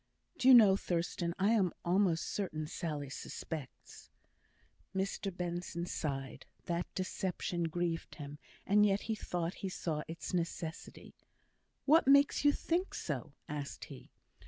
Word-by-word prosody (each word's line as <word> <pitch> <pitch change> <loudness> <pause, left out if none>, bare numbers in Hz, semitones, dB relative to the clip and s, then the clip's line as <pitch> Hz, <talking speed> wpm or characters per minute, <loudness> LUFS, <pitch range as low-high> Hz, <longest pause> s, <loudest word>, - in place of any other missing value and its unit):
"Do 255 - +2
you 260 - +11
know, 210 -5 +8
Thurstan, 170 -1 -1
I 200 +2 +3
am 195 -6 +3
almost 175 -2 +2
certain 155 -6 -2
Sally 150 -4 -4
suspects." 150 -1 -7 0.9
Mr 195 +1 -1
Benson 175 -1 -3
sighed. 135 -6 -4 0.2
The 170 0 -1
deception 180 -2 -2
grieved 165 0 -2
him, 145 -1 -8 0.3
and 210 +1 +5
yet 200 -1 +3
he 225 - -2
thought 175 -4 -2
he 195 - -2
saw 160 -4 -2
its 165 +3 -6
necessity. 165 -2 -4 0.7
"What 310 0 +5
makes 280 +1 +6
you 290 - +7
think 345 +5 -1
so?" 140 -3 -4
asked 145 -1 -5
he. - - -13
175 Hz, 135 wpm, -34 LUFS, 160-195 Hz, 0.9 s, you